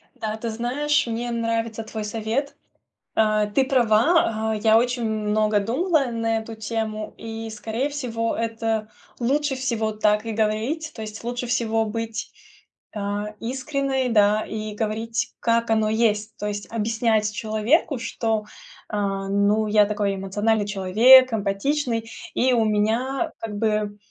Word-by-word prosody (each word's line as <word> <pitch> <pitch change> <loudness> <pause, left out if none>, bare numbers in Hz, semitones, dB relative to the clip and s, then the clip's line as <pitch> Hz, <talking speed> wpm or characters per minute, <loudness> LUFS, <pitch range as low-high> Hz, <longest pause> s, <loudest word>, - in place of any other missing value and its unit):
Да, 220 0 -3
ты 230 +1 -4
знаешь, 280 +6 0
мне 235 +1 -3
нравится 230 -1 -1
твой 220 -1 -6
совет. 225 +6 -2 0.6
Э, 215 -1 +3
ты 265 - +3
права, 235 -1 +3
а, - - -1
я 220 +1 +4
очень 245 0 0
много 215 -1 +1
думала 280 - +1
на 225 -1 -1
эту 220 0 -8
тему, 215 -1 -4
и, 225 0 -6
скорее 225 +5 -3
всего, 230 -6 -2
это 225 -1 -2 0.3
лучше 275 +3 +1
всего 230 -4 -1
так 210 0 +1
и 225 - -3
говорить. 225 +9 -1
То 220 - -7
есть 215 +1 -7
лучше 245 +1 -3
всего 225 -2 +1
быть, 225 0 -4 0.6
а, 205 +1 -3
искренной, 265 +1 -1
да, 210 -1 +4
и 215 -1 -5
говорить, 225 +2 -2
как 230 0 +1
оно 220 -1 +2
есть. 215 -1 +1
То 210 - -3
есть 205 +1 -5
объяснять 225 -1 +1
человеку, 230 +6 +1
что, 225 -3 -1 0.4
а, 195 -2 -2
ну, 205 +2 +2
я 210 0 +5
такой 205 -1 -1
эмоциональный 205 +3 0
человек, 225 +6 +6
эмпатичный, 225 +3 -1 0.3
и 255 0 +3
у 230 -2 +3
меня, 235 +9 0
как 210 -2 -5
бы, 210 -1 0
225 Hz, 140 wpm, -23 LUFS, 215-240 Hz, 0.6 s, человек